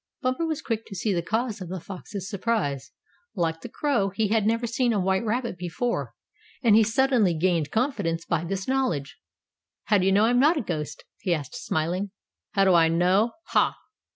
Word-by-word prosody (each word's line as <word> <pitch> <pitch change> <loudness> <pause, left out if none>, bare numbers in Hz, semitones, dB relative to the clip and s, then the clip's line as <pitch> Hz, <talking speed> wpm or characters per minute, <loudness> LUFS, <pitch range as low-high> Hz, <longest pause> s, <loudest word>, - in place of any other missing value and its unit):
Bumper 255 +6 0
was 315 -1 -3
quick 225 -1 -3
to 195 - -8
see 200 +3 0
the 175 - 0
cause 225 +3 -2
of 180 - -6
the 185 0 -4
fox's 195 +2 -7
surprise. 195 - -2 0.4
Like 165 -3 -1
the - - -7
crow, 275 -10 0
he 205 +2 -1
had 215 -1 +2
never 230 +2 +1
seen 235 +1 +1
a 205 - +1
white 190 +1 +1
rabbit 230 -4 -2
before, 180 +8 -2 0.5
and 225 -3 +6
he 225 - +7
suddenly 225 -4 +3
gained 165 -2 +1
confidence 175 - -1
by 170 -2 0
this 190 +2 -3
knowledge. 255 - -1 0.6
"How 210 -1 +3
do 185 - +1
you - - +4
know 205 +3 +5
I'm 245 +2 +3
not 305 +5 +4
a - - 0
ghost?" 155 -8 -4 0.2
he 175 -3 +1
asked, 145 -4 -6
smiling. 175 +6 -2 0.4
"How 195 -2 +3
do 190 - +5
I 165 -1 +6
know? 180 +7 +2 0.2
Ha! - - +2
200 Hz, 195 wpm, -26 LUFS, 175-230 Hz, 0.6 s, he